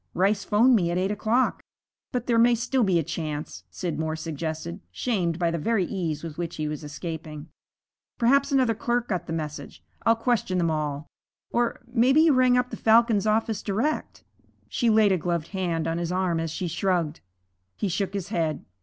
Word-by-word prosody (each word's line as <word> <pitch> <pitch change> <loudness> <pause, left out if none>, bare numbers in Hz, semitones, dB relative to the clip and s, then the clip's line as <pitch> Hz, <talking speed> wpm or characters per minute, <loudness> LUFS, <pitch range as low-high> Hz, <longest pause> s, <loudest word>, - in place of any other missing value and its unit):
Rice 200 +2 +2
'phoned 235 +6 +4
me 175 -6 +2
at 175 - -1
eight 190 +2 0
o'clock.' 225 +5 +1 0.5
'But 245 -2 -2
there 235 -2 +2
may 240 +1 +5
still 245 +2 0
be 190 -4 +3
a 165 - +1
chance,' 150 - -5
Scidmore 160 - -3
suggested, 160 - -5
shamed 170 - -1
by 170 -2 +1
the 170 - -2
very 215 +2 +1
ease 165 -6 -3
with 165 -1 -7
which 170 -1 -3
he 155 -1 -2
was 150 +1 -5
escaping. 155 0 -7 0.7
'Perhaps 275 +4 +3
another 260 -4 +3
clerk 240 +2 -1
got 180 -4 -2
the - - -5
message. 150 -3 -6 0.2
I'll 230 - +4
question 225 -5 0
them 170 -2 +1
all. 150 -1 -2 0.5
Or 240 0 0
maybe 250 +5 +4
you 320 -2 +5
rang 255 -1 +4
up 250 0 0
the - - -5
Falcon's 225 -2 +4
office 220 -1 +1
direct.' 225 +10 -2 0.4
She 240 - 0
laid 215 -2 +5
a 185 - +2
gloved 170 -1 -2
hand 175 -4 -2
on 165 +1 -1
his 170 0 -2
arm 180 -2 0
as 165 0 -2
she 175 +3 -3
shrugged. 170 -2 -1 0.6
He - - -2
shook 195 +2 -2
his 195 -2 -4
head. 160 -7 -1
185 Hz, 190 wpm, -26 LUFS, 160-230 Hz, 0.7 s, may